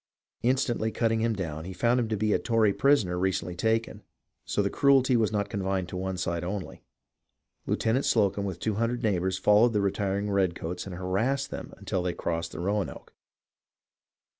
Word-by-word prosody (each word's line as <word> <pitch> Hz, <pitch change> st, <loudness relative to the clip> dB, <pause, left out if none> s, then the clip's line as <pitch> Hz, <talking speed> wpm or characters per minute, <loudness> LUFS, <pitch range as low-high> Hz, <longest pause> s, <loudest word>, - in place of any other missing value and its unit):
Instantly 120 Hz, -3 st, +1 dB
cutting 115 Hz, -1 st, +1 dB
him 115 Hz, -1 st, +1 dB
down, 80 Hz, -5 st, -4 dB
he 95 Hz, +2 st, -7 dB
found 120 Hz, +6 st, +2 dB
him 120 Hz, -, 0 dB
to 110 Hz, -, -1 dB
be 105 Hz, +1 st, +1 dB
a -, -, +2 dB
Tory 110 Hz, -4 st, +2 dB
prisoner 105 Hz, -12 st, +2 dB
recently 90 Hz, -2 st, -1 dB
taken. 110 Hz, +4 st, 0 dB, 0.4 s
So 105 Hz, -, 0 dB
the 100 Hz, -, -1 dB
cruelty 135 Hz, -2 st, +4 dB
was 110 Hz, -3 st, +2 dB
not 100 Hz, -2 st, 0 dB
confined 95 Hz, -3 st, -2 dB
to -, -, -7 dB
one 95 Hz, 0 st, -3 dB
side 85 Hz, -2 st, -2 dB
only. 95 Hz, +1 st, -5 dB, 0.9 s
Lieutenant 120 Hz, +5 st, +1 dB
Slocumb 100 Hz, -3 st, +2 dB
with 95 Hz, -3 st, -4 dB
two 110 Hz, -, -1 dB
hundred 120 Hz, +1 st, -1 dB
neighbours 95 Hz, -3 st, +1 dB
followed 105 Hz, +5 st, +4 dB
the 105 Hz, -, +2 dB
retiring 100 Hz, +1 st, -1 dB
redcoats 90 Hz, -2 st, -1 dB
and 90 Hz, -, -6 dB
har 90 Hz, +1 st, -6 dB
assed 135 Hz, +4 st, 0 dB
them -, -, -7 dB
until 95 Hz, -, -2 dB
they 90 Hz, -1 st, -1 dB
crossed 85 Hz, -1 st, -3 dB
the -, -, -6 dB
Roanoke. 100 Hz, +2 st, -3 dB
100 Hz, 180 wpm, -28 LUFS, 95-115 Hz, 0.9 s, cruelty